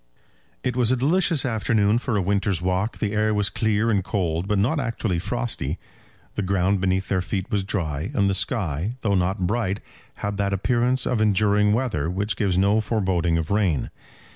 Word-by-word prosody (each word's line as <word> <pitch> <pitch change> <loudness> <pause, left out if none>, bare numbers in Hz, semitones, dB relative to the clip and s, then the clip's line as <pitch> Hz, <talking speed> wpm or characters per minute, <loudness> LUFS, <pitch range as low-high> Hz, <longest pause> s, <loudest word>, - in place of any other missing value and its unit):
It 125 -1 -1
was 125 -2 +2
a 130 - +2
delicious 165 +2 +2
afternoon 110 -2 +2
for 120 -3 -1
a 95 - +1
winter's 100 -1 +1
walk. 95 +5 -1
The 105 -1 -2
air 105 0 +1
was 105 -1 +1
clear 110 +1 +1
and 100 -3 +1
cold, 90 -3 -1
but 105 -1 +1
not 125 +11 +1
actually 115 -8 -1
frosty. - - -2 0.6
The - - -2
ground 95 0 +1
beneath 95 0 0
their 95 -2 +1
feet 95 +1 -4
was 100 -2 +1
dry, 80 -5 -2
and 100 - +3
the 100 - +2
sky, 95 - -1
though 100 -3 +1
not 95 +1 +1
bright, 100 -1 -1 0.4
had 100 0 -4
that 100 0 0
appearance 120 +5 +1
of 120 -4 0
enduring 105 0 +3
weather 110 - 0
which 100 +4 -2
gives 95 -5 0
no 100 +3 +3
foreboding 95 -7 0
of 80 +1 -3
rain. 95 -9 +1
100 Hz, 185 wpm, -24 LUFS, 95-110 Hz, 0.6 s, and